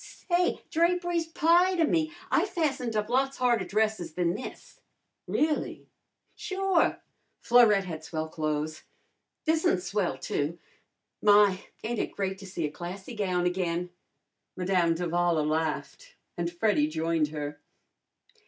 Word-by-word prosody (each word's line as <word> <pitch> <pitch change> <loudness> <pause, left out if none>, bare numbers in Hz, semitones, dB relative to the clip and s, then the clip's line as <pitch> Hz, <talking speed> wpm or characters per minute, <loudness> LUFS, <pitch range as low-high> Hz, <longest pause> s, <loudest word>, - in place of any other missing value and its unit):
"Say, 355 +1 +2
drapery's 345 0 +1
pie 345 +3 +3
to 335 -2 +3
me. 315 0 +1 0.2
I - - +3
fastened 270 - -1
up 210 0 0
lots 270 +3 +1
harder 240 -6 +2
dresses 210 -5 0
than 175 0 +1
this." 255 - -9 0.5
"Really?" 305 0 -1 0.5
"Sure! 380 -3 +1 0.4
Florette 230 -5 +5
had 160 -3 -6
swell 160 -1 -3
clo'es. 155 0 -3 0.6
This'n's 315 - +2
swell, 190 -5 -1
too. 150 +5 -2 0.6
My! 205 -2 +5 0.2
ain't 230 +1 -2
it - - -2
great 190 -1 -2
to 195 - -10
see 175 -3 -3
a 150 - -3
classy 185 +7 -7
gown 185 -5 0
again!" 180 -1 -1 0.6
Madame 180 -2 +2
d'Avala 170 -2 +1
laughed 160 - -3 0.2
and 170 0 -2
Freddy 175 -4 +2
joined 160 0 0
her. 145 -1 -5
195 Hz, 125 wpm, -28 LUFS, 170-270 Hz, 0.6 s, Florette